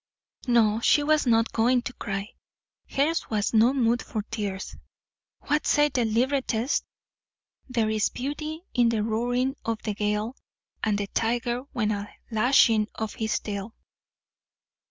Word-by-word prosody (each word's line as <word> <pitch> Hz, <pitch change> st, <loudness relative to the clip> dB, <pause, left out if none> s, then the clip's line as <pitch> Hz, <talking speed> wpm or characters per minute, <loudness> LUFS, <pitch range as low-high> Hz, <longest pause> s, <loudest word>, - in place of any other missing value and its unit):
No, 225 Hz, -3 st, +4 dB
she 290 Hz, -, +4 dB
was 305 Hz, -2 st, +2 dB
not 230 Hz, -1 st, +3 dB
going 240 Hz, +2 st, +3 dB
to 255 Hz, -, -5 dB
cry. 195 Hz, -1 st, -4 dB, 0.6 s
Hers 300 Hz, +4 st, 0 dB
was 210 Hz, -1 st, 0 dB
no 225 Hz, +3 st, +5 dB
mood 240 Hz, -3 st, +1 dB
for 215 Hz, -2 st, -4 dB
tears. 200 Hz, -4 st, -4 dB, 0.7 s
What 295 Hz, +1 st, 0 dB
said 295 Hz, -1 st, +3 dB
the 245 Hz, -2 st, +2 dB
librettist? 245 Hz, +2 st, 0 dB, 0.8 s
"There 230 Hz, -4 st, +1 dB
is 215 Hz, -1 st, +1 dB
beauty 305 Hz, +5 st, -5 dB
in 240 Hz, -2 st, +4 dB
the 220 Hz, -2 st, 0 dB
roaring 245 Hz, +5 st, 0 dB
of 225 Hz, -1 st, -2 dB
the 215 Hz, -, -2 dB
gale, 210 Hz, +3 st, -1 dB, 0.5 s
and 210 Hz, -2 st, +1 dB
the 205 Hz, -, -1 dB
tiger 240 Hz, +4 st, -1 dB
when 215 Hz, -3 st, 0 dB
a 205 Hz, 0 st, -3 dB, 0.2 s
lashing 225 Hz, -1 st, +4 dB
of 220 Hz, -1 st, -4 dB
his 220 Hz, -1 st, -1 dB
tail." 205 Hz, +2 st, -5 dB
230 Hz, 140 wpm, -26 LUFS, 215-255 Hz, 0.8 s, no